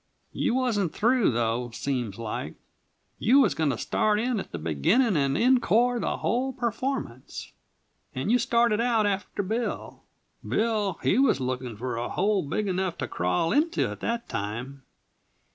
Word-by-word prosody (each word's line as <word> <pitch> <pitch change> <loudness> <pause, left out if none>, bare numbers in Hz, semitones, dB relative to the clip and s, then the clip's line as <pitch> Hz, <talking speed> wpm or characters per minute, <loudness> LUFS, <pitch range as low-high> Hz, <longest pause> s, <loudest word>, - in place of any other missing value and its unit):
You - - 0
wasn't 220 -9 0
through, 240 +1 +3
though, 120 +1 -1
seems 120 -8 -2
like. 115 -2 -5 0.6
You 255 +6 +5
was - - +4
going 155 -2 0
to 125 - -1
start 210 - +1
in 240 -1 0
at - - -7
the - - -4
beginning 170 - +2
and 140 -2 +1
en 255 +1 +4
core 240 +4 +2
the - - -1
whole 260 +3 -1
performance, 240 - -4 0.6
and 130 +11 -1
you 245 - +4
started 235 -2 +2
out 230 -3 +2
after 200 0 -2
Bill. 225 +5 -3 0.4
Bill, 215 -5 0
he 230 - +3
was 270 - +3
lookin' 125 -3 -3
for 125 +1 -3
a 120 - -3
hole 200 +1 +1
big 200 +8 -2
enough 185 -2 -1
to - - -3
crawl 90 - 0
into 330 +4 +2
by - - -4
that 235 0 -3
time. 120 +7 -5
200 Hz, 160 wpm, -26 LUFS, -, 0.6 s, You